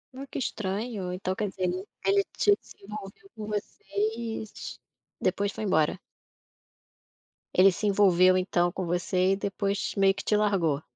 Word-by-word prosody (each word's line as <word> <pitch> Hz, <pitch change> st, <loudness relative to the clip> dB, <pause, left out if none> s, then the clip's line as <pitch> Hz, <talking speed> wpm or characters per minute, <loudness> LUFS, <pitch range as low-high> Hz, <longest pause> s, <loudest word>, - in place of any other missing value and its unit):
Ah, 270 Hz, +1 st, -6 dB
que -, -, -5 dB
estranho, 205 Hz, -4 st, -3 dB
então, 185 Hz, +1 st, -2 dB
quer 205 Hz, -, -1 dB
dizer, 185 Hz, -1 st, -2 dB, 0.4 s
ele 395 Hz, 0 st, +4 dB
te 410 Hz, -1 st, +4 dB
se -, -, -16 dB
envolveu 210 Hz, -, -9 dB
com 215 Hz, -1 st, -6 dB
vocês, 220 Hz, +1 st, -3 dB
t -, -, -8 dB, 0.4 s
depois 200 Hz, +2 st, 0 dB
foi 220 Hz, -, -5 dB
embora? 155 Hz, -6 st, +2 dB, 1.5 s
Ele 190 Hz, +2 st, +7 dB
se 210 Hz, +4 st, -2 dB
envolveu, 185 Hz, -2 st, +5 dB
então, 175 Hz, -1 st, +1 dB
com 185 Hz, -, -3 dB
você 180 Hz, +2 st, +1 dB
e -, -, +2 dB
depois 200 Hz, 0 st, -2 dB
meio 195 Hz, -1 st, +4 dB
que -, -, -7 dB
te 210 Hz, -, +2 dB
largou? 190 Hz, -9 st, +2 dB
195 Hz, 155 wpm, -28 LUFS, 185-215 Hz, 1.5 s, Ele